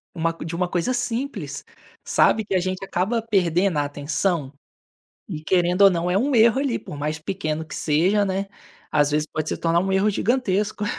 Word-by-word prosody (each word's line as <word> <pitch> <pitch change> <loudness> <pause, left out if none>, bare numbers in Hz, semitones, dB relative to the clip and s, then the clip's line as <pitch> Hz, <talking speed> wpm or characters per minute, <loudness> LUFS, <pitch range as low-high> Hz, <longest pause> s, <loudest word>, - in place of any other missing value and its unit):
uma 165 0 0
de 165 0 -6
uma 180 +1 0
coisa 180 +9 -1
simples, 235 - -3 0.4
sabe, 220 - +3
que 195 - -4
a - - +4
gente 185 +1 -3
acaba 195 +5 -1
perdendo 185 -5 +1
a 145 - 0
atenção? 145 +1 -2 0.8
E 160 -5 -5
querendo 180 +2 +2
ou 195 - +9
não, 175 0 -1
é 185 - +2
um 270 +4 0
erro 230 +2 +5
ali, 275 -4 0
por 145 - -9
mais 150 +1 -3
pequeno 160 -2 -3
que 160 - -9
seja, 180 +7 +2
né, 195 +1 -2 0.4
às 145 -1 +3
vezes 150 +1 +1
pode 155 0 -4
se - - -1
tornar 170 0 +1
um 190 +1 -1
erro 195 +2 +3
gigantesco. 210 -2 0
185 Hz, 190 wpm, -23 LUFS, 155-205 Hz, 0.8 s, ou